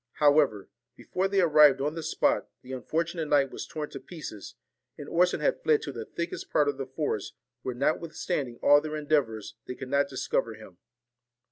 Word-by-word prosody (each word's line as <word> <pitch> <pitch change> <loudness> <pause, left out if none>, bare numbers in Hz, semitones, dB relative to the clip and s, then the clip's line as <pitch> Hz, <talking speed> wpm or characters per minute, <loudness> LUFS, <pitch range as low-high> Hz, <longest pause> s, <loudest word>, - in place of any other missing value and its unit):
However, 145 -8 +3 0.3
before 185 +8 -2
they 195 0 +2
arrived 150 -5 +6
on 145 +3 -1
the 165 - -5
spot, - - +1
the 130 - -10
unfortunate 160 +5 -2
knight 140 -2 +3
was - - -6
torn 150 -1 -5
to - - -7
pieces, 150 - -9 0.4
and - - -8
Orson 180 +1 +2
had - - +1
fled 450 -3 +3
to - - -4
the 445 - -6
thickest 170 - -5
part 150 -1 +3
of 140 -1 -1
the 135 - -3
forest, 130 -6 -3 0.3
where, 130 -2 -4
notwithstanding 145 -2 -1
all 145 0 +7
their 155 0 -5
endeavours, 130 -8 0
they 125 - -5
could 130 +1 -8
not 140 0 +2
discover 130 -4 -1
him. 100 -5 -14
145 Hz, 180 wpm, -28 LUFS, 130-165 Hz, 0.4 s, all